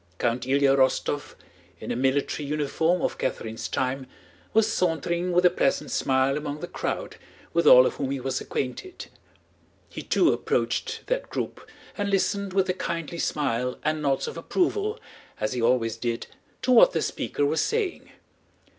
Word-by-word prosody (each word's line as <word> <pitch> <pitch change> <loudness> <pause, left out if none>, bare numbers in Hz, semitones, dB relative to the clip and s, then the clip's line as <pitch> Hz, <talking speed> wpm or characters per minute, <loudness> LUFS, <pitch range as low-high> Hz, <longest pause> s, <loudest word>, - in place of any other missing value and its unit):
Count 120 +3 -1
Ilyá 135 0 +4
Rostóv, 140 +2 0 0.4
in - - -5
a - - -1
military 135 +4 0
uniform 160 +4 0
of - - -1
Catherine's 115 -3 -3
time, 130 0 -2 0.4
was 220 0 +4
sauntering 170 +1 0
with 180 +1 +3
a 180 - +7
pleasant 135 -6 0
smile 135 +1 +2
among 150 0 -4
the - - -5
crowd, - - -4 0.4
with 170 -2 +2
all 125 -2 +9
of - - -1
whom 135 -2 -2
he 135 0 -2
was 130 +1 -2
acquainted. 140 - -4 0.8
He - - -7
too - - +3
approached - - -1
that - - -2
group - - -5 0.3
and 205 -1 -2
listened 200 0 0
with 190 -1 +2
a 185 - +1
kindly 170 -2 -4
smile 125 -5 -1
and 155 0 0
nods 140 -2 0
of - - -6
approval, 405 - 0 0.4
as 135 - -1
he 125 - -2
always 115 -1 +2
did, 120 -1 -2 0.4
to 255 - +2
what 240 - +7
the 160 - 0
speaker 145 - -1
was 155 +3 +1
saying. 435 -5 -2
145 Hz, 165 wpm, -26 LUFS, 130-180 Hz, 0.8 s, all